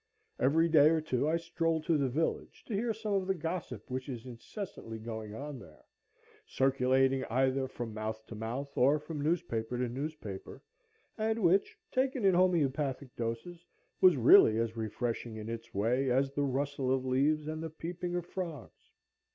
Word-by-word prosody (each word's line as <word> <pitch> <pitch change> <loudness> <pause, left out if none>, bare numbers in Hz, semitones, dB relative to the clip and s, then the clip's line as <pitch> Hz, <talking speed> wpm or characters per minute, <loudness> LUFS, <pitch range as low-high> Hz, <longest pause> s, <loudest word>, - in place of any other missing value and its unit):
Every 160 +6 +4
day 155 -2 +6
or 160 0 +3
two 150 -2 0
I 165 - +2
strolled 165 -1 -1
to 165 - +3
the 140 -3 +1
village 155 +6 -2
to 230 - -6
hear 225 +4 0
some 215 -1 -3
of 190 -1 0
the 190 - +1
gossip 160 - -5
which 130 +2 -4
is 120 -3 -6
incessantly 125 - -7
going 110 -1 -6
on 145 +2 -6
there, 75 -9 -16 0.6
circulating 135 0 +2
either 130 +2 +1
from 120 -3 -6
mouth 110 0 -4
to - - -9
mouth, 120 +6 -5
or 140 +4 +4
from 150 0 -6
newspaper 125 -7 -1
to 125 0 0
newspaper, 125 -6 -6 0.6
and 220 0 0
which, 185 +3 +3
taken 260 -3 0
in 190 - +6
homœopathic 145 -7 +1
doses, 120 +10 -4 0.4
was 180 -5 +7
really 110 -2 +7
as 115 0 -1
refreshing 115 +1 -3
in 110 0 -6
its 115 0 -6
way 120 +6 +1
as 135 +2 +2
the 145 0 0
rustle 140 0 -1
of 130 0 +1
leaves 145 +4 +2
and 155 0 -4
the 165 - -4
peeping 175 +3 -5
of 175 -1 -2
frogs. 170 - -7
135 Hz, 170 wpm, -32 LUFS, 120-165 Hz, 0.6 s, was